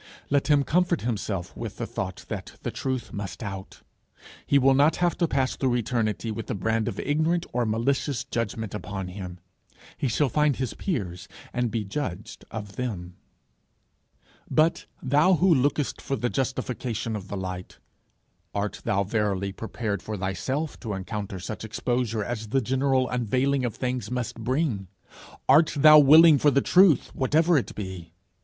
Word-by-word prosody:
Let 140 -1 +2
him 145 -2 +4
comfort 175 +2 +1
himself 100 -6 -3
with - - -6
the - - -3
thought - - -5
that - - -6
the - - -2
truth 130 -3 -3
must 100 -1 -5
out. 95 -2 -7 0.6
He 140 - +4
will 135 0 +5
not 145 +4 +4
have 175 -1 +1
to 170 - +3
pass 135 -3 0
through 130 -3 +1
eternity 115 -2 -1
with 110 +1 -5
the - - -2
brand 110 +3 0
of 105 -4 -3
ignorant 160 +4 +1
or 120 -1 +1
malicious 130 +4 0
judgment 115 -4 -3
upon 100 -3 -5
him. 90 -1 -7 0.6
He 140 - 0
shall 135 +5 +2
find 150 +1 +2
his 130 -2 -3
peers 95 - -3 0.3
and 125 -1 0
be 110 0 -2
judged 100 -3 -5
of 105 -2 -7
them. 90 -8 -4 1.3
But, 165 +2 +2 0.2
thou 150 +8 +4
who 180 +1 +4
lookest 145 +1 0
for 135 - -2
the 120 -2 -2
justification 125 -4 -2
of 100 -2 -6
the 100 - -5
light, 90 -1 -6 0.8
art 100 +1 -2
thou 100 -1 +1
verily 100 -2 -1
prepared 105 -1 -4
for 110 -1 -5
thyself 105 - -3
to 110 -5 -4
encounter 100 0 -5
such 105 +5 -6
exposure 115 0 -1
as 110 0 -4
the 135 +6 +1
general 130 +1 +1
unveiling 130 +3 0
of 115 - -3
things 125 -4 -3
must 125 -2 -3
bring? 120 - -1 0.6
Art 155 +5 +5
thou 150 +1 +9
willing 155 +1 +8
for 145 - +5
the 140 - +3
truth 180 -4 +4
whatever 160 +6 +3
it 135 - 0
be? 95 -5 -7
120 Hz, 160 wpm, -26 LUFS, 105-140 Hz, 1.3 s, thou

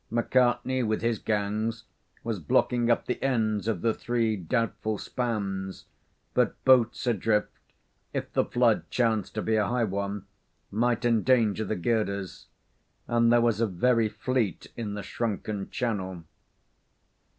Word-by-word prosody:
McCartney, 125 +2 +2
with 110 0 -1
his 115 -2 +1
gangs, 110 +2 -1 0.4
was 115 -4 -2
blocking 120 +9 +2
up 120 - +2
the 125 - -3
ends 110 -5 0
of 105 -7 -1
the 115 - +2
three 115 -2 0
doubtful 110 +3 -1
spans, 100 -6 -3 0.5
but - - 0
boats 125 -1 +4
adrift, 110 -2 +1 0.6
if - - -4
the - - +3
flood 120 -3 +1
chanced 110 -6 0
to 110 - -2
be 110 - +1
a 105 - +2
high 120 0 +1
one, 100 -1 -3 0.5
might 120 +2 +1
endanger 115 -2 +3
the 105 - -2
girders; 100 -1 -2 0.6
and 115 0 +3
there 120 0 +5
was 115 -2 +2
a 115 - +3
very 115 +4 +2
fleet 110 - -1
in 105 -3 -4
the 105 - -5
shrunken 105 -3 -3
channel. 95 -8 -3
110 Hz, 140 wpm, -27 LUFS, 105-120 Hz, 0.6 s, there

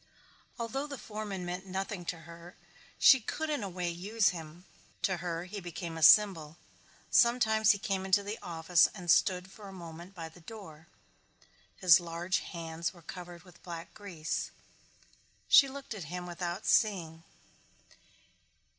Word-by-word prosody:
Although 255 +5 -3
the 280 -2 -6
foreman 210 -5 -6
meant 180 +2 -5
nothing 190 -1 -4
to 165 -1 -4
her 170 +1 -12 0.4
she 265 - +7
could 315 +7 -3
in 290 - -1
a 200 - -4
way 180 -1 -3
use 205 +5 +1
him. 165 +1 -9 0.4
To 190 -2 +1
her 170 -1 -4
he 185 +3 -7
became 175 -2 -6
a 160 - -6
symbol. 165 -3 +6 0.5
Sometimes 220 -3 +4
he 205 - +6
came 195 -3 -2
into 190 +1 +3
the 205 +2 -5
office 165 0 +3
and 175 -4 0
stood 185 0 +2
for 205 0 -12
a - - -9
moment 170 +1 -10
by 165 -2 -6
the 160 +2 -16
door. 160 -5 -11 0.9
His 180 -5 +7
large 175 +2 -2
hands 165 0 -5
were 170 - -16
covered 175 -1 -9
with 180 -2 -18
black 170 -2 -8
grease. 180 -7 -4 1.0
She 275 - +8
looked 275 -2 -7
at 195 -7 -7
him 180 +3 -6
without 175 +2 -5
seeing. 170 -7 +1
180 Hz, 155 wpm, -31 LUFS, 170-205 Hz, 1.0 s, She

